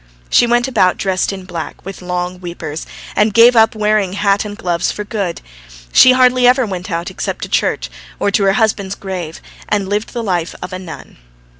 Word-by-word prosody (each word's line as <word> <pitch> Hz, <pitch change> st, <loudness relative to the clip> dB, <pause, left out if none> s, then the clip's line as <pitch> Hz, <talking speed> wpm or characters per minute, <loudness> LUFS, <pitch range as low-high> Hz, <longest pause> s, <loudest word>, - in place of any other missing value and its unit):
She 240 Hz, -, +5 dB
went 240 Hz, +1 st, +2 dB
about 200 Hz, -8 st, +2 dB
dressed 190 Hz, -1 st, 0 dB
in 190 Hz, -2 st, -8 dB
black 170 Hz, -2 st, -7 dB
with 195 Hz, 0 st, -8 dB
long 180 Hz, 0 st, -3 dB
"weepers," 165 Hz, -3 st, -6 dB, 0.3 s
and 210 Hz, -1 st, +2 dB
gave 235 Hz, +2 st, +7 dB
up 225 Hz, 0 st, +4 dB
wearing 210 Hz, -3 st, +1 dB
hat 200 Hz, 0 st, +1 dB
and 205 Hz, 0 st, -7 dB
gloves 175 Hz, -4 st, -1 dB
for 210 Hz, -, -5 dB
good. 205 Hz, -5 st, -3 dB, 0.5 s
She 255 Hz, -, +8 dB
hardly 255 Hz, -1 st, +4 dB
ever 255 Hz, 0 st, +4 dB
went 185 Hz, -2 st, -5 dB
out, 170 Hz, -1 st, -3 dB
except -, -, -4 dB
to -, -, -5 dB
church, -, -, 0 dB, 0.3 s
or 200 Hz, -, +1 dB
to 200 Hz, 0 st, +2 dB
her 195 Hz, -, +4 dB
husband's 205 Hz, -2 st, 0 dB
grave, 180 Hz, -5 st, -6 dB, 0.3 s
and 205 Hz, -2 st, 0 dB
led 205 Hz, +2 st, 0 dB
the 240 Hz, -2 st, -5 dB
life 180 Hz, -5 st, -2 dB
of -, -, -7 dB
a 185 Hz, -, -4 dB
nun. 180 Hz, -3 st, -10 dB
195 Hz, 195 wpm, -16 LUFS, 180-220 Hz, 0.5 s, She